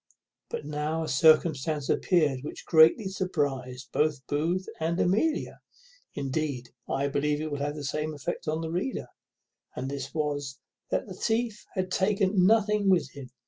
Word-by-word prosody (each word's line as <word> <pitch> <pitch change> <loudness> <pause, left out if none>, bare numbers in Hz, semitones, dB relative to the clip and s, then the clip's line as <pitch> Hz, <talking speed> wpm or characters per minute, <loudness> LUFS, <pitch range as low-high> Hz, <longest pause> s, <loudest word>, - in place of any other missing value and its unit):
But - - -5
now 150 +2 -2
a - - -4
circumstance 155 0 +3
appeared 150 -8 +2
which 150 - -8
greatly 165 +6 +6
surprized 135 - -2
both 150 -3 0
Booth 170 +6 0
and 165 +2 -1
Amelia; 225 - +1 0.6
indeed, 135 -3 -2 0.2
I 140 +1 0
believe 145 +1 0
it 155 0 -4
will 145 - -3
have 145 +1 -2
the 150 - -6
same 150 +2 -2
effect 145 - -5
on 155 +1 -1
the 160 0 -4
reader; 185 +10 -3 0.7
and 135 +1 -4
this 135 -1 -5
was, 145 -3 -2 0.3
that - - 0
the 190 - -8
thief 225 +2 -1
had 185 -1 -2
taken 190 -1 +3
nothing 210 -2 +3
with 170 -8 +3
him. 140 -3 -10
155 Hz, 155 wpm, -28 LUFS, 140-185 Hz, 0.7 s, greatly